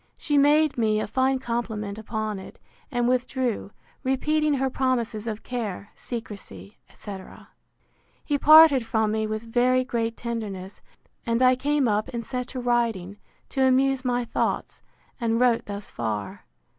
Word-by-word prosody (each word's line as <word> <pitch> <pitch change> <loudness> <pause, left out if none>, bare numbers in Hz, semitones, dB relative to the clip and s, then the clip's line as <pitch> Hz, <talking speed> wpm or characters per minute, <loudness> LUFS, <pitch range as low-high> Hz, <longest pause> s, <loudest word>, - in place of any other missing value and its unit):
She 295 - -1
made 295 0 +4
me 215 -2 +2
a - - -1
fine 265 +3 +1
compliment 220 -4 -3
upon 215 -2 -3
it, 190 - -11 0.3
and 245 -3 0
withdrew, 255 -3 -1 0.3
repeating 300 +3 +1
her 265 0 0
promises 245 -4 -1
of 220 -1 -4
care, 215 -5 -5
secrecy, 200 - -8
etc. 195 -3 -10 0.8
He 290 -2 0
parted 310 -4 +8
from 220 -1 0
me 220 0 -1
with 215 +1 -3
very 250 +2 +2
great 230 -2 -2
tenderness; 205 -5 -5 0.4
and 230 -1 0
I 255 0 +6
came 285 +1 +1
up 210 0 +1
and 235 -2 -5
set 250 0 -4
to 260 - -6
writing, 230 -6 0 0.3
to 270 - -2
amuse 265 0 +2
my 245 -1 0
thoughts, - - -2 0.4
and 230 -1 0
wrote 245 -2 +2
thus 200 0 -7
far. 105 -4 -4
235 Hz, 145 wpm, -25 LUFS, 215-260 Hz, 0.8 s, parted